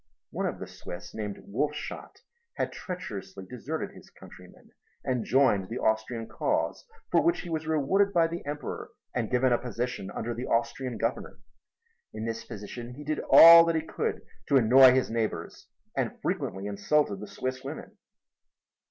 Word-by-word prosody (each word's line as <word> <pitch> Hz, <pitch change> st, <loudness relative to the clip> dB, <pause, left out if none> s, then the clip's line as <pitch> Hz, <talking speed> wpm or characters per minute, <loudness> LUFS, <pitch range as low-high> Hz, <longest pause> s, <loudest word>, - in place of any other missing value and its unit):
One -, -, -1 dB
of -, -, -4 dB
the -, -, -6 dB
Swiss 85 Hz, 0 st, -9 dB
named 105 Hz, -2 st, -5 dB
Wolfshot 145 Hz, +8 st, -4 dB, 0.3 s
had -, -, -2 dB
treacherously 100 Hz, -, -7 dB
deserted 130 Hz, +9 st, -5 dB
his -, -, -15 dB
countrymen -, -, -16 dB, 0.3 s
and 125 Hz, -3 st, -1 dB
joined 105 Hz, -7 st, +2 dB
the 115 Hz, -, -4 dB
Austrian 110 Hz, +1 st, -1 dB
cause, 115 Hz, -, -2 dB, 0.2 s
for -, -, +4 dB
which 340 Hz, +1 st, +1 dB
he 175 Hz, -, -8 dB
was 160 Hz, -1 st, -3 dB
rewarded 160 Hz, +7 st, +2 dB
by 170 Hz, -3 st, +4 dB
the 170 Hz, +1 st, -4 dB
Emperor 145 Hz, -2 st, -5 dB, 0.2 s
and 120 Hz, -3 st, -1 dB
given 125 Hz, 0 st, +3 dB
a 120 Hz, -, +2 dB
position 125 Hz, -4 st, -4 dB
under 120 Hz, -, -4 dB
the 120 Hz, +2 st, -5 dB
Austrian 120 Hz, +1 st, -1 dB
Governor. -, -, -3 dB, 0.8 s
In 110 Hz, -, -4 dB
this 115 Hz, -1 st, -4 dB
position 120 Hz, +4 st, -8 dB
he 150 Hz, -, -9 dB
did 150 Hz, +1 st, -2 dB
all 165 Hz, 0 st, +11 dB
that 165 Hz, 0 st, +1 dB
he 160 Hz, -, 0 dB
could -, -, -3 dB, 0.2 s
to 140 Hz, -, +4 dB
annoy 130 Hz, +2 st, +8 dB
his 130 Hz, -3 st, +1 dB
neighbors 115 Hz, -2 st, -3 dB, 0.3 s
and -, -, -2 dB
frequently 95 Hz, +1 st, -2 dB
insulted 100 Hz, +4 st, +1 dB
the 105 Hz, -, -7 dB
Swiss 130 Hz, 0 st, -4 dB
women. -, -, -8 dB
125 Hz, 160 wpm, -28 LUFS, 110-150 Hz, 0.8 s, all